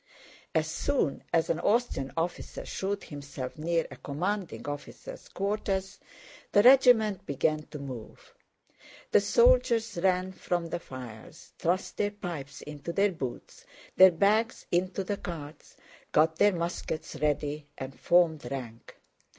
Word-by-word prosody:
As 160 -1 +3
soon 165 - -1
as 165 -1 +2
an 165 - -1
Austrian 205 - +1
officer 170 +2 -3
showed 200 +1 -3
himself 140 -4 -7
near 165 +1 +1
a 130 - -9
commanding 180 +8 -3
officer's 145 0 -7
quarters, 195 -1 -2 0.5
the 205 - +6
regiment 235 -6 +6
began 150 +2 0
to 150 - -8
move: 130 -6 -9 0.8
the - - +6
soldiers 240 - +3
ran 185 0 +2
from 175 -2 -2
the 175 - -2
fires, 125 -1 -11
thrust 180 +3 -1
their 205 - +1
pipes 175 -9 -7
into 150 +2 -6
their 200 +3 +2
boots, 135 -8 -7 0.3
their 190 0 +9
bags 210 +6 +2
into 185 +2 0
the 200 +2 -2
carts, 155 -5 -8 0.3
got 160 +1 +3
their 205 -1 +5
muskets 170 -2 -4
ready, 150 0 -1
and 135 0 -7
formed 160 -7 +3
rank. 120 -4 -7
170 Hz, 130 wpm, -29 LUFS, 145-200 Hz, 0.8 s, their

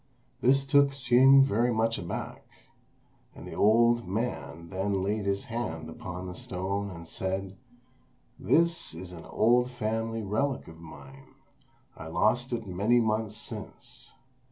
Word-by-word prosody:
This 135 +2 +3
took 140 0 +4
Hsing 135 +1 +6
very 120 -1 +1
much 115 0 0
aback; 85 - -6 0.9
and - - -10
the - - -8
old 115 0 +3
man 85 -7 -4
then 95 0 -1
laid 100 +1 -1
his 100 0 0
hand 80 -9 -5
upon 90 +2 -7
the 90 - -6
stone 100 +3 -3
and 85 -3 -10
said, 95 +2 -4 0.8
"This 170 - +2
is 90 +2 -8
an 85 -2 -10
old 120 +2 +2
family 115 -1 -3
relic 125 +7 -1
of 80 0 -12
mine: 135 +12 -13 0.6
I 80 - -9
lost 120 +9 +1
it 115 -2 -3
many 100 +6 +2
months 110 -1 -1
since. - - -8
110 Hz, 135 wpm, -28 LUFS, 95-120 Hz, 0.9 s, Hsing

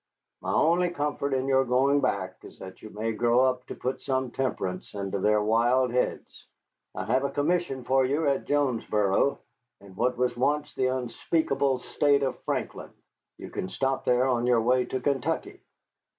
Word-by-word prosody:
"My - - -3
only 175 +3 +3
comfort 145 -3 -2
in 130 -1 0
your 135 -1 +4
going 135 +3 +2
back 95 -5 -1
is - - -13
that 95 0 -11
you 110 - -9
may 110 +2 -3
grow 120 +2 +2
up 130 -1 +1
to - - -6
put 130 +1 -3
some 130 -2 -1
temperance 95 -10 -3
into 100 0 -3
their 105 +2 +2
wild 120 +4 +2
heads. 125 +1 -3 0.5
I - - -4
have 130 +3 +1
a 140 - 0
commission 145 -2 -1
for 130 +2 +2
you 145 +4 0
at 140 -1 0
Jonesboro, 120 -5 +1 0.4
in 100 -1 -15
what 125 +4 0
was 125 0 0
once 145 +4 0
the 130 - 0
unspeakable 135 +2 0
State 140 +2 +1
of 135 - -2
Franklin. - - -3 0.5
You - - -9
can 95 - -4
stop 135 +6 -1
there 125 +1 +2
on 120 -2 +1
your 120 -2 +4
way 125 +2 +2
to 130 - -3
Kentucky." 140 +4 -2
130 Hz, 175 wpm, -27 LUFS, 120-140 Hz, 0.5 s, your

